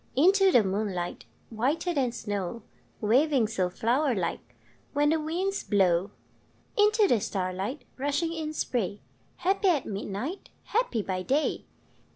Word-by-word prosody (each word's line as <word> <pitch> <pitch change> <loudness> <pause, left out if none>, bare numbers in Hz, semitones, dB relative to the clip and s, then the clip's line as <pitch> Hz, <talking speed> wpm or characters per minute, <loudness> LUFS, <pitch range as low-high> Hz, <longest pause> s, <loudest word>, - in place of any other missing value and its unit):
Into 380 +7 +5
the 240 -9 +6
moonlight, 190 -3 -2 0.3
Whiter 280 +10 0
than 265 -5 +1
snow, 205 -1 -4 0.4
Waving 255 +2 +3
so 190 -4 0
flower 245 +8 +1
like 170 - -4 0.4
When 290 +1 +3
the 320 - +2
winds 360 +6 -2
blow! 190 -2 +2 0.7
Into 420 0 +4
the 240 - +3
starlight, 190 +8 -3
Rushing 290 +5 0
in 315 -2 -3
spray, 210 - -2 0.3
Happy 390 +2 +1
at 320 -8 +3
midnight, 205 - -5
Happy 420 - 0
by 185 -1 -2
day! 275 +10 0
245 Hz, 130 wpm, -28 LUFS, 200-320 Hz, 0.7 s, the